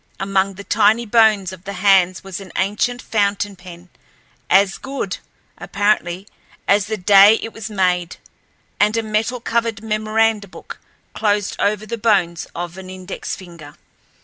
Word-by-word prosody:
Among 195 0 0
the 200 - -9
tiny 215 +3 +2
bones 215 -4 +3
of 185 -1 -12
the 200 +1 -6
hands 185 -2 +3
was 195 -1 -7
an 190 -3 -11
ancient 210 +6 -1
fountain 205 -1 -1
pen, 180 -1 -13 0.6
as 195 0 +3
good, 265 -8 -5 0.4
apparently, 200 -2 -1 0.4
as 200 0 +3
the 220 0 -3
day 200 +3 +7
it 225 - -6
was 225 0 -7
made, 180 -4 0 0.6
and 210 +2 +3
a 225 - 0
metal 220 +3 -1
covered 230 -2 -2
memoranda 215 -1 0
book, - - -11 0.3
closed 205 -2 0
over 210 +1 0
the 230 +2 -5
bones 185 -7 +1
of 175 +1 -6
an 185 -1 -10
index 185 0 -6
finger. 170 -6 -13
200 Hz, 150 wpm, -19 LUFS, 185-215 Hz, 0.6 s, day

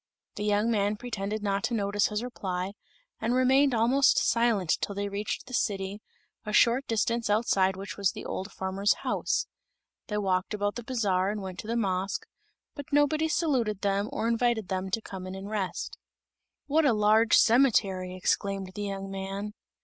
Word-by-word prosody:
The 205 - -5
young 210 +2 +2
man 205 -1 +1
pretended 215 -3 -4
not 200 0 0
to 235 0 -1
notice 205 -1 +1
his 210 +2 -3
reply, 190 -6 -3 0.5
and 235 +2 0
remained 265 +1 +4
almost 250 +5 +4
silent 225 -7 +2
till 200 - -3
they 200 0 -2
reached 200 +1 -3
the 255 - -11
city, 200 -3 -1 0.4
a 210 - -5
short 240 +5 +4
distance 230 0 0
outside 195 -3 +2
which 195 +1 -7
was 200 -2 +2
the - - -8
old 190 +2 -4
farmer's 190 +2 0
house. - - 0 0.6
They 210 - -2
walked 190 0 0
about 205 0 -1
the 240 - -6
bazaar 200 -6 0
and 210 +1 -2
went 190 -2 -7
to - - -7
the 230 +1 -1
mosque, 195 -2 -1 0.5
but 285 -1 -9
nobody 290 +2 +3
saluted 255 - 0
them 200 +1 0
or 225 - -1
invited 230 -3 +1
them 190 0 -2
to 225 +4 -1
come 185 -1 -7
in 185 - -6
and 195 +1 -7
rest. 200 -4 -3 0.7
"What 310 +3 +2
a 275 -5 +4
large 215 +2 +4
cemetery!" 205 -7 +3
exclaimed 195 +1 -1
the 205 - -6
young 195 -1 -4
man. 195 +2 -5
210 Hz, 175 wpm, -28 LUFS, 195-235 Hz, 0.7 s, remained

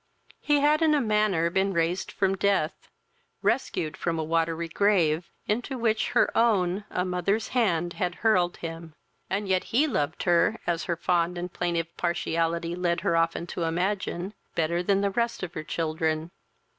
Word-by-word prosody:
He 295 -1 +2
had 300 +2 +3
in 315 -2 +4
a - - +3
manner 210 -8 +2
been 195 +1 +1
raised 170 +2 0
from 195 -1 +1
death, 195 -5 0 0.5
rescued 155 -1 0
from 165 -1 -2
a 160 - -1
watery 165 +1 0
grave, 170 -3 +2 0.2
into 245 +5 -2
which 225 -2 +1
her - - +3
own, 205 -4 +2
a 180 - -1
mother's, 185 +4 -1
hand 175 -9 +1
had 180 -3 -2
hurled 180 -5 +3
him; 165 -1 -7 0.3
and 200 +1 -1
yet 185 -1 +1
he 270 +7 +2
loved 160 - -1
her, 175 +5 +3
as 170 -1 -1
her 170 - -1
fond 175 +1 0
and 175 0 -5
plaintive 170 -1 -2
partiality 170 -1 -1
led 175 -1 0
her 170 - +1
often 165 0 +1
to 175 - -6
imagine, 180 +2 -1 0.2
better 170 +2 +1
than 195 +2 +2
the 200 0 +1
rest 235 0 -1
of 175 -2 -5
her 155 - -5
children. 160 0 -2
175 Hz, 170 wpm, -27 LUFS, 165-200 Hz, 0.5 s, in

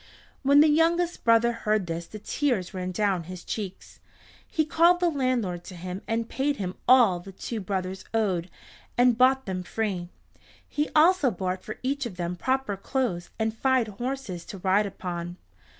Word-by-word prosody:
When 280 +1 +6
the 310 - +6
youngest 335 +3 +2
brother 230 +1 +4
heard 215 -3 0
this 165 0 -4
the 215 - -8
tears 215 -4 -1
ran 185 -1 -3
down 190 -3 0
his 180 0 -8
cheeks. 200 -4 -6 0.5
He 315 - 0
called 340 +3 +4
the 350 -1 +2
landlord 245 - -1
to 185 - -9
him 180 +2 -6
and 225 0 -1
paid 280 +3 0
him 185 -5 -4
all 240 -8 +6
that 190 +2 -12
the - - -31
two 230 - -3
brothers 190 -1 -3
owed, 190 -6 0 0.5
and 245 -1 +5
bought 265 +2 +4
them 185 -2 -3
free. 185 -3 -3 0.6
He 295 +1 -1
also 320 -2 +5
bought 185 -2 -3
for 215 - -7
each 275 0 -1
of 200 - -10
them 175 0 -2
proper 260 +1 -1
clothes 195 -6 -2
and 220 0 -1
fine 260 0 +2
horses 220 -4 -5
to 195 - -8
ride 195 +3 +2
upon. 175 -2 -5
215 Hz, 175 wpm, -26 LUFS, 185-265 Hz, 0.6 s, When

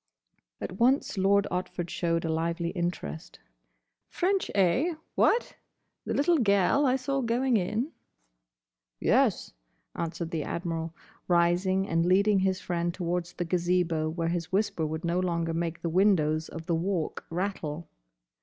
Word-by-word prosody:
At 185 - -6
once 255 +3 +3
Lord 200 +1 +3
Otford 180 -1 -3
showed 165 -1 0
a 160 - 0
lively 170 +1 -1
interest. 170 - -4 0.7
"French, 385 +2 0
eh?—What? 310 - +1 0.5
the - - -2
little 325 +3 +3
gel 200 +6 +3
I 255 - +3
saw 270 +1 -1
going 245 +1 +1
in?" 215 - 0 1.1
"Yes," - - +2 0.4
answered 165 0 -4
the 160 - -1
Admiral, 165 0 -4 0.3
rising 180 +2 +2
and 165 -2 +1
leading 200 +2 +4
his 190 0 +1
friend 175 -1 -1
towards 175 0 -3
the 175 - -3
Gazebo 170 -2 +1
where 165 +1 -2
his 170 0 -3
whisper 195 -5 0
would 160 +2 -4
no 170 +1 +1
longer 170 -2 -1
make 165 0 -3
the - - 0
windows 160 -4 +2
of 165 0 -8
the 170 - 0
Walk 170 0 -1
rattle. 170 -3 -3
175 Hz, 135 wpm, -28 LUFS, 165-200 Hz, 1.1 s, leading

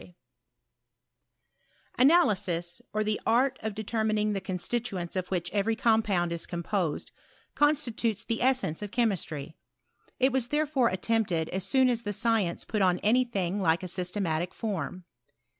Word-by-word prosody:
I 180 - -15 1.8
I - - -1
Analysis, 190 - +3
or 215 0 0
the 215 0 -1
art 250 +4 +2
of 220 -2 -3
determining 215 -1 0
the 195 - -2
con 185 0 -3
stituents 195 -4 -3
of 185 -1 -2
which 175 -2 -2
every 210 +2 +1
compound 215 -7 +2
is 170 - -4
composed, 170 -2 -2 0.4
constitutes 240 -7 +1
the 230 - -2
essence 250 -11 +1
of 210 - -4
chemistry: 185 - -1 0.6
it 260 +1 +3
was 255 -2 0
there 300 +4 +1
fore 270 -5 +2
Attempted 185 -4 0
as 190 +1 -2
soon 260 +4 +4
as 240 -2 +1
the 205 -3 -3
science 210 -4 0
put 215 -3 -1
on 180 -2 +3
any 245 +5 +4
thing 195 -5 -2
like 165 0 +2
a - - -3
systematic 180 -2 -2
form. 190 -4 -4
210 Hz, 155 wpm, -28 LUFS, 180-235 Hz, 1.8 s, soon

